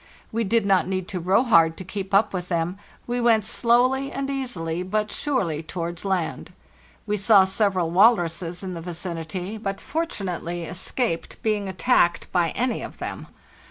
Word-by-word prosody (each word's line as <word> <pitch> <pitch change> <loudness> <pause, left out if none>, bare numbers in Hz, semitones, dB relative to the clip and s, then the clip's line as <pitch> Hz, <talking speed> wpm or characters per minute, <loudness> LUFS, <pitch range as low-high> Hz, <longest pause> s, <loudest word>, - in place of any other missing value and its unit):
We 230 +1 0
did 225 +1 +1
not 195 -2 +3
need 185 -1 -2
to 185 - -3
row 185 +7 +3
hard 165 -9 +4
to - - -6
keep 190 +1 -6
up 205 +2 +3
with 180 -1 -4
them; 175 +2 -1 0.3
we 245 0 -2
went 230 -2 +4
slowly 255 +3 +2
and 275 0 -3
easily, 180 -12 -3
but 210 +3 -1
surely, 190 - -1
towards 170 +1 -5
land. 190 -4 -2 0.5
We 210 - -1
saw 200 -1 +6
several 190 -3 0
walruses 175 -3 +3
in 185 -1 -4
the 170 - -6
vicinity, 175 +3 -5
but 195 -2 -3
fort 330 +2 -2
unately 175 -3 -4
escaped 180 +1 -2
being 210 -3 0
attacked 185 -3 +2
by 175 -2 +2
any 245 0 0
of - - -8
them. - - -6
190 Hz, 165 wpm, -24 LUFS, 175-225 Hz, 0.5 s, saw